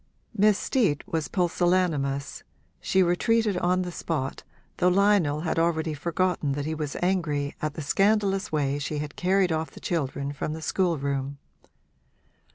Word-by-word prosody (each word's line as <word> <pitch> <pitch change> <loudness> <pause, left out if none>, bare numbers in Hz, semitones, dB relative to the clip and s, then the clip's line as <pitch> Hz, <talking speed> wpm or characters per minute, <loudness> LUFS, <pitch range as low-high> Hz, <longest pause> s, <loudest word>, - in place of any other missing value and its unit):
Miss 210 -1 +4
Steet 200 - +1
was 160 -4 -2
pusillanimous 175 -6 0 0.4
she 190 0 +2
retreated 210 +4 +2
on 180 +1 +1
the 180 - -5
spot, 155 -6 -3 0.4
though 180 - +3
Lionel 180 -6 +3
had 165 0 -1
already 160 -1 +1
forgotten 170 -1 -1
that 145 0 -3
he 160 - -2
was 150 -2 -4
angry 155 -6 0
at 155 -1 -2
the 155 - -5
scandalous 195 +4 +1
way 145 -2 0
she 150 +1 -3
had 145 0 -5
carried 185 0 +2
off 160 0 -1
the - - -13
children 140 -4 -2
from 150 +2 -3
the 160 - -6
schoolroom. 140 -7 -1
165 Hz, 150 wpm, -26 LUFS, 145-185 Hz, 0.4 s, Miss